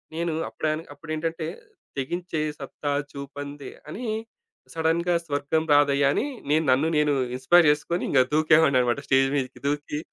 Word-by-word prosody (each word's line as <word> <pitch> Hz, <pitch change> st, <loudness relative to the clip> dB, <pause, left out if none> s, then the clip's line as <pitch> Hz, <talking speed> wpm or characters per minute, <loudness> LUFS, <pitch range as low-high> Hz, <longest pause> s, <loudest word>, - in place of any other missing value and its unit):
నేను 170 Hz, 0 st, -1 dB, 0.2 s
అప్పుడని 155 Hz, +1 st, -2 dB
అప్పుడేంటంటే 160 Hz, +2 st, -4 dB, 0.5 s
'తెగించే 170 Hz, +4 st, -3 dB, 0.2 s
సత్తా 145 Hz, +1 st, -4 dB, 0.2 s
చూపందే 140 Hz, 0 st, -7 dB, 0.2 s
అని 230 Hz, +11 st, -6 dB, 0.7 s
సడెన్‌గా 165 Hz, +2 st, +1 dB
స్వర్గం 145 Hz, +1 st, 0 dB
రాదయ్యా' 140 Hz, -1 st, +4 dB
అని -, -, 0 dB, 0.2 s
నేను 155 Hz, +2 st, +3 dB
నన్ను 135 Hz, +5 st, +3 dB
నేను 150 Hz, -1 st, +3 dB, 0.2 s
ఇన్‌స్పైర్ 165 Hz, +6 st, +5 dB
జేసుకొని, 150 Hz, +4 st, 0 dB
ఇంగ 130 Hz, -, +5 dB
దూకేవాడినన్నమాట. 140 Hz, -5 st, +4 dB
స్టేజ్ 135 Hz, 0 st, +4 dB
మీదకి 130 Hz, -2 st, -3 dB
దూకి 145 Hz, +1 st, -2 dB
150 Hz, 125 wpm, -25 LUFS, 140-160 Hz, 0.7 s, ఇన్‌స్పైర్